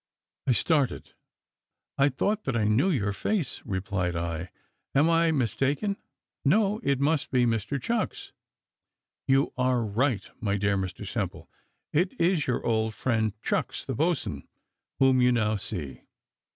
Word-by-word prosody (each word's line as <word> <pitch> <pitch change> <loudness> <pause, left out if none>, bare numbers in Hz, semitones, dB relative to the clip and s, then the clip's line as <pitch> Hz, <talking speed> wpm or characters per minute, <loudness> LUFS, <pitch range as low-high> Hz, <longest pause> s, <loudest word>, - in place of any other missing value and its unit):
I 130 - +5
started 145 +1 +1 0.8
"I 140 +1 +4
thought 205 +11 -1
that 135 -3 0
I 110 - +1
knew 110 - +3
your 105 - 0
face," 180 - -1
replied 95 -3 -2
I; 85 +1 -3 0.5
"am 150 +5 +4
I 165 0 +4
mistaken? 140 - 0 0.5
no, 205 +7 +3
it 140 - +1
must 150 +1 +1
be 125 -2 +3
Mr 115 +4 -1
Chucks!" 230 +4 -2 0.9
"You 135 +1 +3
are 125 -2 +2
right, 115 +2 0
my 100 -2 0
dear 100 0 +1
Mr 95 -2 -4
Simple; - - -4 0.5
it 175 +5 +1
is 170 -3 +2
your 125 - -1
old 110 -2 +1
friend, 110 -4 0
Chucks, - - -1
the - - -3
boatswain, 150 - -1 0.5
whom 130 -1 +4
you 125 0 +5
now 110 -3 +2
see." 75 -10 -4
125 Hz, 140 wpm, -27 LUFS, 105-150 Hz, 0.9 s, I